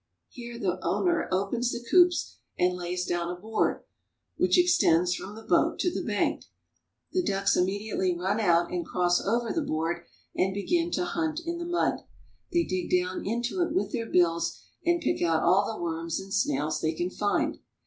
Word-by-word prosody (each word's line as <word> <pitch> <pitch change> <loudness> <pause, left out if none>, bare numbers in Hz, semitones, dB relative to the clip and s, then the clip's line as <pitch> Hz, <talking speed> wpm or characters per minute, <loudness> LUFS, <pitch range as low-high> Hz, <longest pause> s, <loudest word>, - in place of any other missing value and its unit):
Here 235 -1 -8
the 185 -4 -2
owner 350 -2 +1
opens 200 +6 0
the 240 0 -5
coops 355 -1 +4 0.2
and 180 0 +2
lays 180 0 -3
down 175 -1 -1
a 180 0 -5
board 220 +3 -1 0.5
which - - +3
extends 180 - +4
from 200 +3 -6
the 225 - -10
boat - - +2
to 355 - +1
the - - -2
bank. - - -1 0.7
The 370 - +1
ducks 195 - +1
immedi 200 +4 0
ately 185 -2 +1
run 190 +5 0
out 170 -4 +3
and 175 -1 -1
cross 175 0 +1
over 230 +3 0
the 330 - 0
board 170 - -2 0.3
and 190 +1 +1
begin 335 - 0
to 355 - 0
hunt 320 -2 -2
in 340 0 -3
the 340 - -4
mud. 345 0 +1 0.5
They 345 -1 +3
dig 185 - -3
down 180 +1 0
into 240 - -1
it 345 - 0
with 375 - 0
their 230 -4 -3
bills 170 -2 +2 0.3
and 345 0 +2
pick - - 0
out 165 -2 +2
all 190 +4 +4
the 220 - -7
worms 165 -1 -2
and 195 0 -8
snails 155 -6 0
they 160 0 0
can 175 +3 -2
find. 205 +1 0
195 Hz, 190 wpm, -28 LUFS, 175-245 Hz, 0.7 s, coops